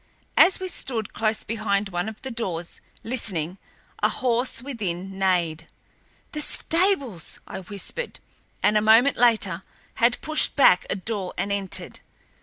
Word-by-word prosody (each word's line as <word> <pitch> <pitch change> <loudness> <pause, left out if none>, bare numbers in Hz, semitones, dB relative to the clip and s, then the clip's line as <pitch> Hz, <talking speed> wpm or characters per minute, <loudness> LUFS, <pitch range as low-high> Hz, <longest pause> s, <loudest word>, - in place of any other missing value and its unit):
As 380 - +6
we 375 - -3
stood 235 - -3
close 215 -1 0
behind 210 -2 -1
one 175 +2 -2
of 220 - -12
the 265 - -5
doors, 180 -8 -4 0.2
listening, 195 -7 -1 0.4
a - - +4
horse 245 -1 0
within 195 -7 -4
neighed. 170 -4 0 0.6
"The 300 - -3
stables!" 315 - +1
I - - -7
whispered, 200 - -6 0.4
and, 210 0 +4
a - - -2
moment 225 +6 +5
later, 215 -7 +3 0.4
had 235 +1 +4
pushed 310 0 +2
back 225 -10 +5
a - - 0
door 200 -1 -4
and 200 - -2
entered. 200 -2 -1
215 Hz, 140 wpm, -24 LUFS, 185-245 Hz, 0.6 s, As